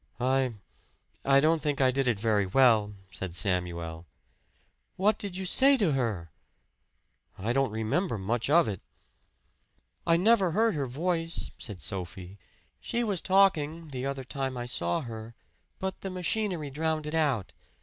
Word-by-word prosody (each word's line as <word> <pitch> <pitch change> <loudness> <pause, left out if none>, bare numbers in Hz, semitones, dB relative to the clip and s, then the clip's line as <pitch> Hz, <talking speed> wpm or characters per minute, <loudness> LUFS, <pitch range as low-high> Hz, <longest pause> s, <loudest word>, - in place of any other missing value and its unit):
"I 130 -1 +1 0.7
I 135 0 +5
don't 155 +2 +3
think 145 -1 -1
I 130 -1 +4
did 135 0 0
it 115 -4 +1
very 105 -3 +1
well," 110 -2 +4 0.2
said 85 0 -6
Samuel. 85 -4 -2 0.9
"What 205 +4 +2
did 195 -3 -5
you 190 - -4
say 270 +8 +6
to 200 -9 +2
her?" 110 - -2 1.1
"I 110 +5 -1
don't 135 -1 +2
remember 110 - -1
much 115 +6 -1
of 170 0 +5
it." 100 -4 -4 1.3
"I 165 0 +5
never 195 -2 +3
heard 225 +2 +3
her 140 -4 -2
voice," 165 +5 -2
said 105 -6 -7
Sophie. 95 0 -5 0.4
"She 240 - -2
was 200 -6 -1
talking, 165 -5 +2
the 130 -1 -4
other 135 -1 -4
time 130 0 -4
I 120 - -4
saw 85 - -1
her, 115 -3 -8 0.4
but 190 0 -4
the 195 - -4
machinery 185 -4 -2
drowned 155 +1 -1
it 150 - -5
out. 145 - 0
135 Hz, 150 wpm, -28 LUFS, 110-170 Hz, 1.3 s, say